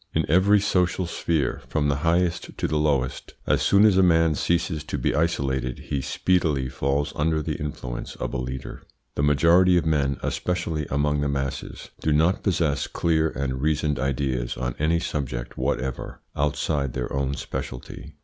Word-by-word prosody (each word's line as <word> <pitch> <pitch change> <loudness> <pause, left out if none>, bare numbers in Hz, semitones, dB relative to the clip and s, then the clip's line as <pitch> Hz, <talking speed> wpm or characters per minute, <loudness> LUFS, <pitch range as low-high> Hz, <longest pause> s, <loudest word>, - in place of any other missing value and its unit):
In 80 - +2
every 95 +6 +5
social 90 -2 +1
sphere, 80 -5 -1
from 75 -2 0
the 70 -1 +1
highest 85 +3 0
to - - 0
the 75 - 0
lowest, 70 -4 -1
as - - +2
soon 100 +2 +5
as 100 -3 +5
a - - +6
man 80 -3 +4
ceases 80 0 0
to 75 - -3
be 65 - 0
isolated 65 -6 0
he 70 - -3
speedily 75 -5 +1
falls 70 +2 -1
under 80 +1 +1
the 75 - -2
influence 65 -5 -5
of - - -4
a - - -1
leader. 65 +1 -6 0.3
The - - -2
majority 85 +5 +5
of 85 - +1
men, 70 -4 +1
especially 80 -4 -2
among 75 +1 +1
the 70 - 0
masses, 70 -1 -4
do 80 - +1
not 80 +5 +3
possess 80 -7 0
clear 80 -1 +1
and 65 -1 -3
reasoned 75 -2 0
ideas 65 -2 -1
on 60 0 -2
any 80 +3 +2
subject 65 -7 -4
whatever 65 -1 -3
outside 70 -2 0
their 65 -1 -3
own 70 0 -1
speciality. 70 +4 -7
75 Hz, 170 wpm, -24 LUFS, 70-85 Hz, 0.3 s, a